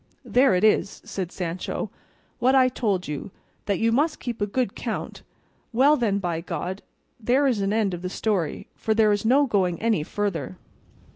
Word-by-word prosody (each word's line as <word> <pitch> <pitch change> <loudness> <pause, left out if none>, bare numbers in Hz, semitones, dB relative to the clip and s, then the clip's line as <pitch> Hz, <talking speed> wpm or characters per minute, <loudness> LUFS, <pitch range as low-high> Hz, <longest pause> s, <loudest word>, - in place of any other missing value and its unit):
"There 255 -4 +4
it 180 - +1
is," 215 -2 +2
said 185 -3 -4
Sancho, 180 0 -4 0.5
"what 260 +2 +3
I 260 -1 +5
told 205 -7 -1
you, 150 +6 -5 0.4
that 200 -2 +1
you 230 0 +2
must 300 +7 +1
keep 235 -4 -5
a 205 - +1
good 250 +4 -1
count; - - -5 0.5
well 270 +6 +5
then, 220 -7 +1
by 175 -4 -2
God, 185 +2 -4 0.4
there 250 +5 +2
is 245 -7 +1
an 195 0 0
end 210 -3 +1
of 175 - -5
the 180 - -3
story, 190 -5 -1
for 220 - -1
there 215 -1 +4
is 205 +1 0
no 270 +5 +5
going 190 -8 +1
any 225 -6 +1
farther." 185 +1 -3
210 Hz, 185 wpm, -25 LUFS, 185-240 Hz, 0.5 s, I